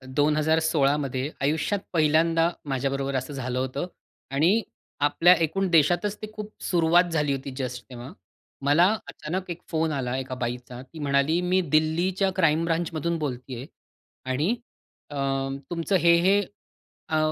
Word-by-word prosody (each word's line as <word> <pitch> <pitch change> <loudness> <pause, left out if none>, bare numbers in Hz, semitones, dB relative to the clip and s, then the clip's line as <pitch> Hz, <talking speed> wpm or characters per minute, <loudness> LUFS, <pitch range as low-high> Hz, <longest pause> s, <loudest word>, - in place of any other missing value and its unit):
2016 155 -1 +3
मध्ये 135 -1 -2
आयुष्यात 155 +8 0
पहिल्यांदा 165 +1 +3 0.2
माझ्याबरोबर 135 +1 -1
असं 130 +3 -3
झालं 130 -2 -3
होतं 130 +6 -2 0.4
आणि 170 +11 +3 0.5
आपल्या 170 +4 +5
एकूण 190 +5 -1
देशातच 175 +5 +3
ती 215 - -4
खूप 215 0 -7
सुरुवात 170 0 +4
झाली 150 -3 +1
होती 135 +1 -6
जस्ट 125 -2 -4
तेव्हा. 125 +3 -9 0.5
मला 150 +5 +5 0.2
अचानक 180 +4 -5
एक 175 +1 -7
फोन 160 -1 0
आला 130 -3 -2
एका 130 -1 -4
बाईचा. 125 0 -5
ती 155 +5 -13
म्हणाली, 140 +3 +2
"मी 180 +1 +2
दिल्लीच्या 175 +5 +2
क्राईम 165 -3 +3
ब्रांचमधून 165 0 -1
बोलतेय." 130 -3 -5 0.6
आणि 145 +9 +1 0.6
अ, - - -6 0.5
तुमचं 175 +3 -1
हे, 170 -1 +5
हे, 195 +3 +4 0.7
अ, 155 - +1
155 Hz, 135 wpm, -25 LUFS, 135-170 Hz, 0.7 s, आपल्या